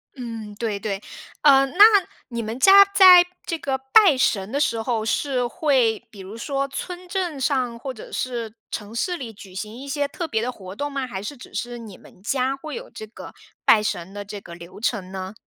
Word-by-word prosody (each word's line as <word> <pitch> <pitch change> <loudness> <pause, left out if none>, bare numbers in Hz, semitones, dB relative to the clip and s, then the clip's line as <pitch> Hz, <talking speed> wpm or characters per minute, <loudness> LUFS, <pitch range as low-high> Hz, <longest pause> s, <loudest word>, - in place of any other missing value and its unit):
嗯， 230 -5 -7
对 215 -2 -3
对。 200 -1 -4 0.4
呃， 275 -2 +6
那 270 - -10 0.5
你 235 -2 -4
们 220 +3 -5
家 390 +7 +8
在 365 -3 +9 0.2
这 330 - -2
个 275 -3 -2
拜 395 -6 +7
神 205 -5 0
的 280 - -1
时 235 -6 +1
候， 225 -1 -1
是 250 +2 0
会 245 -7 +1
比 205 - -14
如 195 +4 -9
说 275 +3 -2
村 360 +6 -7
镇 350 -6 -3
上 250 -4 0
或 265 +2 -5
者 220 - -12
是 235 -4 -4 0.2
城 210 0 -6
市 355 +10 -1
里 235 -6 -7
举 195 -2 -14
行 210 +3 -6
一 270 +3 -9
些 285 +1 -1
特 330 +4 -5
别 220 -7 -1
的 245 +2 -2
活 190 -5 -11
动 290 +5 -4
吗？ 275 -2 -3
还 190 -6 -6
是 285 - -6
只 245 - -13
是 240 0 -4
你 215 -5 -11
们 - - -19
家 260 +5 0
会 305 +3 -8
有 - - -8
这 215 - -9
个 215 - -11 0.3
拜 215 - +6
神 190 -3 -4
的 205 0 -6
这 205 0 -8
个 175 -3 -12
流 170 +3 -12
程 205 -5 -2
呢？ 190 0 -6
240 Hz, 230 characters per minute, -23 LUFS, 210-280 Hz, 0.5 s, 在